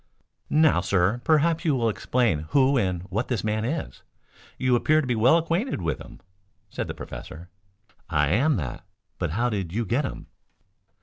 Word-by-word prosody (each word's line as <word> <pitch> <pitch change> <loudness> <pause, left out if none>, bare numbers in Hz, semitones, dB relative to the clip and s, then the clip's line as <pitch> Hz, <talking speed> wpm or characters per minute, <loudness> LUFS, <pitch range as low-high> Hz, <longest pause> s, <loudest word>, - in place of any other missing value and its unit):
"Now, 155 - +4
sir, 95 +5 +1
perhaps 160 +1 +2
you 155 -4 +2
will 120 -3 +1
explain 110 -8 0
who 140 0 +3
and 90 -7 0
what 110 +6 -1
this 120 -7 -2
man 110 0 -1
is? 150 +8 -4 0.6
You 130 -1 +2
appear 155 +6 +3
to 155 - -1
be 125 - 0
well 120 +8 +5
acquainted 170 - -1
with 80 -6 -2
him," - - -12 0.5
said - - -4
the - - -5
professor. 85 +3 -9 0.6
"I 75 -3 +2
am 135 - +3
that. 70 - -4 0.4
But 85 - -1
how 120 +5 +1
did 95 -5 -3
you 115 +5 -1
get 120 +8 0
him?" 130 - -6
115 Hz, 175 wpm, -25 LUFS, 90-145 Hz, 0.6 s, well